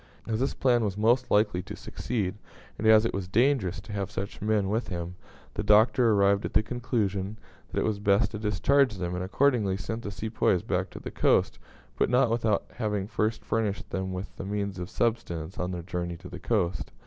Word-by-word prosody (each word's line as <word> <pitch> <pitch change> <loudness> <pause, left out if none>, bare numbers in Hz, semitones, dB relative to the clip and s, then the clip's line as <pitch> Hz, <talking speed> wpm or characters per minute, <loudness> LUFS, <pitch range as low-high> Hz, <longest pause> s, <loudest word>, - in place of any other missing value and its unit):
As 110 -1 -1
this 135 - 0
plan 120 -3 +3
was 100 -2 -2
most 120 +4 +3
likely 105 -3 +2
to - - -8
succeed, 105 -6 -3 0.5
and 110 - +1
as 110 0 +7
it - - -1
was 95 -2 -3
dangerous 110 -3 +2
to 105 - -11
have 100 -1 -2
such 100 -1 -6
men 105 -1 +1
with 110 +4 -1
him, 85 -1 -4 0.4
the - - -3
Doctor 110 +3 +5
arrived 100 0 +3
at - - -4
the 110 - +5
conclusion 110 -4 -2 0.3
that - - -1
it - - 0
was 105 -2 -1
best 100 +1 +3
to 105 - -5
discharge 110 +5 +2
them, 90 -2 -3
and 90 0 -2
accordingly 105 -2 +2
sent 110 +4 -4
the 105 - -5
Sepoys 105 -4 0
back - - -1
to - - -9
the - - -7
coast; 65 -1 +2 0.4
but - - +3
not 125 -1 +3
without 115 -3 +1
having 105 -4 -1
first 110 0 -1
furnished 110 -3 -1
them 95 0 -2
with 90 +2 -6
the - - -5
means 100 -1 -3
of 90 +1 -5
subsistence 95 -9 -2
on 90 - -1
their 90 -2 -4
journey 85 -1 -4
to - - -11
the 90 - -8
coast. 90 -9 -1
105 Hz, 205 wpm, -28 LUFS, 95-115 Hz, 0.5 s, as